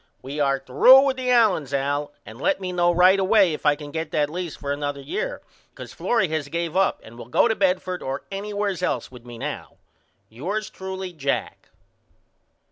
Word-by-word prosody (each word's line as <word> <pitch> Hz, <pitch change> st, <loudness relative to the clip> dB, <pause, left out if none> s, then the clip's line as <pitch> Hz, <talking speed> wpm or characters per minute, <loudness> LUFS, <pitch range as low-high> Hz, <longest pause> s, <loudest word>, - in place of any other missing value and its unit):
We 140 Hz, +3 st, -6 dB
are 140 Hz, -1 st, +2 dB
threw 135 Hz, -, +6 dB
with 275 Hz, -1 st, +1 dB
the 255 Hz, -1 st, -2 dB
Allens 195 Hz, -, +3 dB
Al 145 Hz, +2 st, -1 dB
and 110 Hz, +4 st, -11 dB
let -, -, +1 dB
me 185 Hz, -1 st, -4 dB
know 175 Hz, -1 st, +2 dB
right 180 Hz, +3 st, +5 dB
away 195 Hz, -2 st, +4 dB
if 150 Hz, -, -3 dB
I 145 Hz, -, +5 dB
can 145 Hz, -1 st, -10 dB
get 160 Hz, +1 st, -4 dB
that 150 Hz, -1 st, 0 dB
lease 175 Hz, -2 st, -5 dB
for 140 Hz, -, -5 dB
another 145 Hz, 0 st, -3 dB
year 460 Hz, -, -4 dB, 0.3 s
because -, -, -11 dB
Florrie 230 Hz, -6 st, +1 dB
has 155 Hz, -2 st, -2 dB
gave 170 Hz, +2 st, -3 dB
up 190 Hz, 0 st, +2 dB
and 115 Hz, +2 st, -13 dB
will 115 Hz, -, -9 dB
go 130 Hz, -, +4 dB
to 225 Hz, -, 0 dB
Bedford 185 Hz, -2 st, 0 dB
or 135 Hz, +1 st, -4 dB
anywheres 200 Hz, -1 st, -3 dB
else 180 Hz, -, -2 dB
with 125 Hz, -2 st, -13 dB
me 120 Hz, -1 st, -10 dB
now. -, -, -6 dB, 0.5 s
Yours 190 Hz, -, -4 dB
truly, 190 Hz, -1 st, -6 dB
JACK. 140 Hz, -4 st, -3 dB
170 Hz, 195 wpm, -23 LUFS, 140-195 Hz, 0.5 s, threw